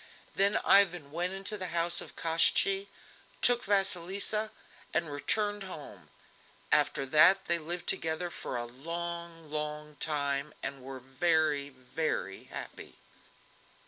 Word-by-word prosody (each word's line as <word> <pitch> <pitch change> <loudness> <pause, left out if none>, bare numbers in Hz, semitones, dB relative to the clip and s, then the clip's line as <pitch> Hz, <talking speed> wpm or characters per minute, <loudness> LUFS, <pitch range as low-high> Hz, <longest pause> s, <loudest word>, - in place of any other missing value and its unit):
Then 200 +2 +3
Ivan 175 -7 +4
went 175 +4 -1
into 195 +2 -2
the 185 - -3
house 170 +1 +1
of - - -9
Koshchei, 195 +4 +2 0.6
took 245 -1 +4
Vasilisa, 200 +2 +1 0.5
and 165 -3 0
returned 205 +8 0
home. 140 - -10 0.6
After 135 - +3
that 155 +8 +5
they 170 0 +2
lived 175 +3 -3
together 165 +2 0
for 125 - -5
a 120 - -3
long, 165 +4 -5
long 150 0 -3
time, 145 -1 0
and 140 -1 -4
were 130 0 -8
very, 145 +1 +1
very 130 - -4
happy. - - -9
165 Hz, 120 wpm, -30 LUFS, 145-185 Hz, 0.6 s, that